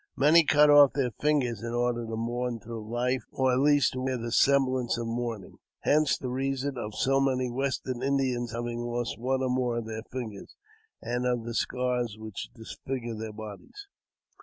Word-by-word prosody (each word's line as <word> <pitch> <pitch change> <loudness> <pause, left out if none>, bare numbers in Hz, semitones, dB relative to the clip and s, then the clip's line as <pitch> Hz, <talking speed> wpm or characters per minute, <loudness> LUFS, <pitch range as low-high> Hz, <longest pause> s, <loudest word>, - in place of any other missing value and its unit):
Many 155 +5 +6
cut 150 0 +5
off 145 -2 +8
their 130 -4 0
fingers 130 -6 0
in 115 0 -4
order 120 -1 0
to 110 - -4
mourn 120 +1 -2
through 110 0 -7
hfe, 125 +2 0
or, 130 -1 +1
at 125 - +2
least, 145 0 +4
to 130 - -4
wear 130 0 -1
the 115 0 -5
semblance 130 -2 +3
of 120 - -3
mourning; 115 -3 -4 0.2
hence 150 -1 +3
the 125 - -5
reason 135 +1 -2
of 110 -3 -5
so 135 +1 +2
many 130 -2 +1
Western 130 -1 -2
Indians 130 -3 0
having 120 +1 -3
lost 120 -1 -3
one 130 +2 0
or 130 - 0
more 125 -2 0
of 115 - -3
their 110 0 -5
fingers, 115 -6 -7 0.5
and 125 +1 -1
of 120 -2 0
the 120 +1 -5
scars 125 -2 -1
which 110 -2 -7
disfigure 120 +1 -5
their 110 0 -5
bodies. 110 - -10
125 Hz, 185 wpm, -28 LUFS, 115-135 Hz, 0.5 s, off